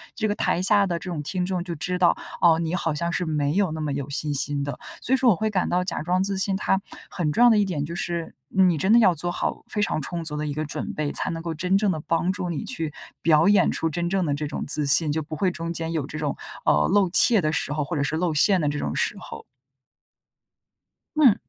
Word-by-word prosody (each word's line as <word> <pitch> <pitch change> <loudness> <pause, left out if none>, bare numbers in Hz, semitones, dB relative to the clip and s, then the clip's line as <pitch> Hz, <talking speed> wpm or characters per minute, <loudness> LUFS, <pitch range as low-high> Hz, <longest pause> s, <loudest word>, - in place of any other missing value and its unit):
这 220 -2 -1
个 205 - -1
台 175 - 0
下 200 +2 +4
的 175 -2 -1
这 185 - -7
种 160 -4 -3
听 180 +5 -2
众 180 -1 -2
就 175 -2 -5
知 180 +4 -3
道， 175 -1 +4 0.3
哦， 165 -2 +5
你 165 +1 -1
好 165 -3 -1
像 170 +3 -2
是 180 +1 -1
没 150 -2 0
有 195 -2 +1
那 155 0 -4
么 150 - -2
有 140 0 -4
信 145 +1 -1
心 145 0 -1
的， 140 -2 -5 0.2
所 260 - -1
以 - - +5
说 255 -1 +4
我 210 - +5
会 220 +5 -1
感 190 -4 0
到 180 +1 +1
假 180 - -3
装 180 +4 +1
自 195 0 -2
信 195 0 0
它 195 0 0 0.3
很 155 -5 -2
重 235 - +3
要 245 - +8
的 225 - +4
一 205 - +3
点 170 -7 -2
就 170 +3 -6
是， 170 -1 -3 0.2
嗯 190 -1 +6
你 170 - 0
真 190 +8 +2
的 235 - +7
要 195 -6 +5
做 175 +3 -3
好 - - -3
非 210 - -2
常 170 - 0
充 170 +4 -5
足 150 -2 -5
的 150 0 -3
一 145 - -3
个 155 +2 -3
准 145 - -5
备， 150 -1 -2
才 - - -1
能 165 0 -4
够 165 -1 -3
真 180 +4 +1
正 205 -1 +1
地 160 - -3
帮 165 +2 +1
助 180 -1 -4
你 160 -4 -3
去 160 -2 -4 0.3
表 160 +1 +4
演 205 -3 +4
出 165 - -1
真 170 +2 -2
正 190 -1 0
的 145 - 0
这 150 +1 -3
种 145 - -4
自 150 0 0
信， 145 +2 +4
就 160 +2 -1
不 155 +1 -7
会 185 +3 +1
中 170 -1 -5
间 165 -1 -4
有 160 -4 -2
这 155 - -7
种， 150 -2 -2 0.3
呃， 75 - +3
露 195 -1 +3
怯 215 +4 +5
的 155 -2 0
时 145 - -1
候 150 0 -1
或 165 +4 -4
者 140 - +1
是 145 - -1
露 165 0 0
馅 185 +5 +4
的 150 - +1
这 145 0 -3
种 - - -3
时 - - 0
候。 - - -9 1.7
嗯。 270 -9 +6
170 Hz, 295 characters per minute, -24 LUFS, 150-190 Hz, 1.7 s, 要